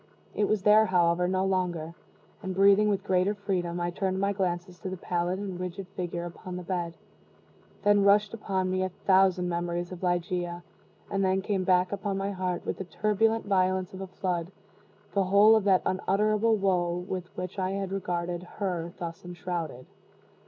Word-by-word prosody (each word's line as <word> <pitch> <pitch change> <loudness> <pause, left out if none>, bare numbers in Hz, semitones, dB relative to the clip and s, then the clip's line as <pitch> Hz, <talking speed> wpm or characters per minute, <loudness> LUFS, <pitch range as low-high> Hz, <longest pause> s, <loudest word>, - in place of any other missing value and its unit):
It 210 - +1
was 215 -3 0
there, 215 +1 +6
however, 175 -1 +3
no 185 +1 +1
longer; 175 -4 -1 0.5
and 190 -2 -4
breathing 200 +2 +5
with 200 -2 0
greater 190 +2 +1
freedom, 180 -4 -2
I 175 0 -1
turned 190 +1 -1
my 200 +1 +1
glances 180 -2 -2
to 185 - -5
the 185 - -5
pallid 175 +1 -1
and 190 -3 -5
rigid 185 +1 -5
figure 175 -2 -4
upon 180 +1 -8
the 180 - -5
bed. 175 -2 -3 0.9
Then 205 -1 +4
rushed 205 +1 +4
upon 190 -4 -1
me 185 0 0
a 185 - 0
thousand 185 -1 +3
memories 175 0 -2
of 180 - -8
Ligeia 175 -1 -1 0.5
and 195 0 +1
then 190 0 +1
came 195 -2 0
back 180 0 +3
upon 200 -1 -2
my 195 +1 -2
heart, 185 -2 -3
with - - -3
the 190 - -4
turbulent 220 +4 +1
violence 185 -2 +1
of 190 - -7
a 190 - -5
flood, 180 -2 -3 0.6
the 195 -1 +2
whole 205 +4 +6
of 215 -3 +1
that 190 -2 +4
unutterable 215 +4 +2
woe 180 -4 +1
with 185 -2 -4
which 185 +2 -5
I 185 0 0
had 195 -1 -3
regarded 175 -2 -2
her 180 -2 -4
thus 170 -2 -6
enshrouded. 170 -7 -5
185 Hz, 180 wpm, -28 LUFS, 175-195 Hz, 0.9 s, there